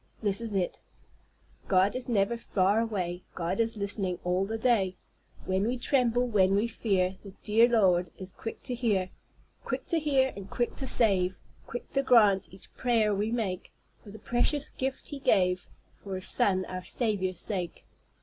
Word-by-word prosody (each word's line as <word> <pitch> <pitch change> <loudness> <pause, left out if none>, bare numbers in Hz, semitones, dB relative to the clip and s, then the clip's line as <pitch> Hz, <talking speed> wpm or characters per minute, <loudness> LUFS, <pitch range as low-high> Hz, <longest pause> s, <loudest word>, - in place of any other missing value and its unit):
This 205 +1 +1
is 225 -3 -4
it: 185 -2 -1 0.9
"God 190 +2 +3
is 255 0 -3
never 210 0 +2
far 205 -2 +1
away; 185 -6 -2
God 175 +3 -2
is 230 -1 +1
listening 200 -3 -2
all 180 +2 0
the 225 +1 -3
day. 215 -6 +2 0.5
When 190 +3 0
we 250 +2 -1
tremble, 245 -1 +2
when 195 -5 +3
we 210 +4 +2
fear, 190 -5 0
The 195 -2 -10
dear 225 +3 +4
Lord 180 -7 +3
is 190 0 -7
quick 225 - -8
to 255 - -2
hear, 210 -7 0 0.5
Quick - - -3
to 335 - +2
hear, 275 -4 +2
and 200 -1 -9
quick 240 - -1
to 265 - -2
save, 190 -7 +2 0.3
Quick 240 - -7
to 275 - +2
grant 215 -7 +4
each 190 - -15
prayer 230 -4 +2
we 205 +3 -1
make, 200 -6 -3 0.3
For - - -12
the 210 - -10
precious 245 +6 0
Gift 265 0 -4
he 285 - -6
gave, 180 -7 +2 0.4
For 195 -2 -5
his 185 - -3
Son 185 -2 +2
our 185 0 -6
Saviour's 190 -4 -1
sake." 180 -6 -2
205 Hz, 175 wpm, -29 LUFS, 185-235 Hz, 0.9 s, dear